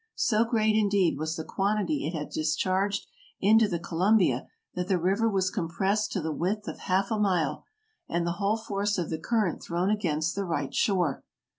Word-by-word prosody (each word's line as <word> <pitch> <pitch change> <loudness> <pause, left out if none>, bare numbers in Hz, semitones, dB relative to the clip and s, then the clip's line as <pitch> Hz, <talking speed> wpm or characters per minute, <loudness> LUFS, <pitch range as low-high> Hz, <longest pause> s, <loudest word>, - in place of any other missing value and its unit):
So 220 0 +2
great, 220 -2 +2
indeed, 200 -7 +2
was 160 +1 -2
the 160 - -4
quantity 210 - -1
it 165 - -4
had 150 - -5
discharged 185 +6 0 0.3
into 220 +2 +5
the 175 -4 -1
Colum 180 +6 +2
bia, 135 - +1 0.3
that 180 0 -3
the 185 - +2
river 195 +6 +1
was 190 -2 +1
compressed 195 +3 -1
to 190 - -1
the 160 0 -2
width 205 +7 -2
of - - -6
half 190 +2 0
a 220 - 0
mile 180 -8 0 0.4
and 170 0 0
the 170 0 -2
whole 205 +3 +2
force 205 -2 -2
of 170 -3 -2
the 160 - -2
current 210 -2 0
thrown 175 +3 -1
against 165 -6 0
the 200 - -2
right 155 -7 -2
shore. 180 -9 +1
190 Hz, 190 wpm, -28 LUFS, 170-210 Hz, 0.4 s, into